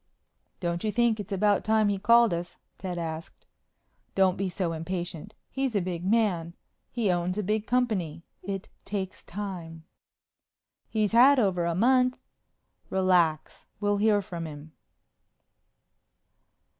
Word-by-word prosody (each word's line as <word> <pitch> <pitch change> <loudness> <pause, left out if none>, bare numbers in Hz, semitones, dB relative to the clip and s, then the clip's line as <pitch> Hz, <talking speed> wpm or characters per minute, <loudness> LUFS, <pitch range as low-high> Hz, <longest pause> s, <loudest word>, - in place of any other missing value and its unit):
"Don't 170 -1 -2
you 215 - 0
think 235 -1 +2
it's 205 - -7
about 205 +1 +2
time 220 -1 +3
he 200 -1 0
called 235 0 +5
us?" 170 +1 -5 0.2
Ted 180 -2 -4
asked. 165 -1 -6 0.7
"Don't 190 -2 +4
be 195 -1 -2
so 175 -2 -2
impatient. 175 +3 -5 0.2
He's 270 -4 -1
a - - +4
big 175 -2 -4
man. 185 -5 +1 0.3
He 225 -6 0
owns 180 +2 -1
a 210 - -1
big 215 +2 -1
company. 195 -11 0 0.2
It 195 0 -5 0.2
takes 190 -2 -5
time." 175 -5 -6 1.1
"He's 215 -2 0
had 255 +5 +7
over 190 -7 +2
a 170 -1 0
month." 250 +5 +3 0.7
"Relax. 180 -5 +1
We'll 205 0 +1
hear 205 -1 +3
from 170 -3 -6
him." 150 +1 -10
190 Hz, 130 wpm, -27 LUFS, 170-215 Hz, 1.1 s, had